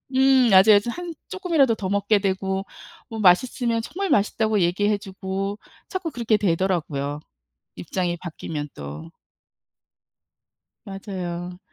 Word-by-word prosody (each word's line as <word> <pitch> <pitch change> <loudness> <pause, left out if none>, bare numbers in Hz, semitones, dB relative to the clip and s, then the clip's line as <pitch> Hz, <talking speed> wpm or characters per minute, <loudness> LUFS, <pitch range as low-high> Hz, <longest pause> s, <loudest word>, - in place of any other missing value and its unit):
음 265 -2 +5
맞아요. 205 +1 +7
저 235 - -5
한 350 +6 -5
쪼끔이라도 330 - +2
더 195 - -4
먹게 200 +2 +2
되고 190 0 -1 0.4
뭐 225 -2 -6
맛있으면 230 +4 +3
정말 390 - -4
맛있다고 215 -2 +2
얘기해 205 +4 +2
주고 195 0 -5 0.3
자꾸 375 -3 -3
그렇게 235 -6 0
되더라고요, 165 -7 -1 0.6
입장이 175 - -2
바뀌면 155 -3 -6
또. 75 +3 -8 1.7
맞아요. 180 -3 -6
195 Hz, 265 characters per minute, -23 LUFS, 180-230 Hz, 1.7 s, 맞아요